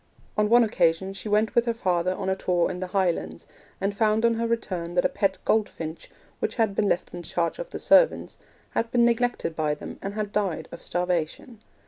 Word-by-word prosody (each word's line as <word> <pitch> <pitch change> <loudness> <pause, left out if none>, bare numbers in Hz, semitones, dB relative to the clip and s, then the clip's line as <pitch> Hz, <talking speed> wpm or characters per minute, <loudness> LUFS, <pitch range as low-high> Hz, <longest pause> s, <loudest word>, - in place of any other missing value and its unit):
On 210 0 +2
one 240 +1 +6
occasion 190 -3 +1
she 205 +2 -6
went 210 +1 +2
with 235 - +3
her 230 - +1
father 185 -4 0
on - - -4
a 190 - +1
tour 180 -2 +1
in 180 - -6
the 185 - -3
Highlands, 175 - -1 0.3
and 200 +1 -1
found 220 +1 +2
on 230 - +4
her 230 0 -1
return 180 -7 -3
that 175 - +2
a - - +4
pet 195 -1 0
goldfinch, 165 -7 -1 0.3
which - - -2
had 220 -4 +1
been 200 0 +1
left - - -1
in 175 - -6
the - - -10
charge 170 -1 -1
of - - -5
the - - -6
servants, - - +3 0.3
had 230 - -1
been 240 0 +3
neglected 235 -7 0
by 150 -2 0
them - - -9
and 195 +1 -5
had 210 -1 -3
died 200 -6 -1
of - - -9
starvation. 180 +6 -2
195 Hz, 215 wpm, -26 LUFS, 175-225 Hz, 0.3 s, one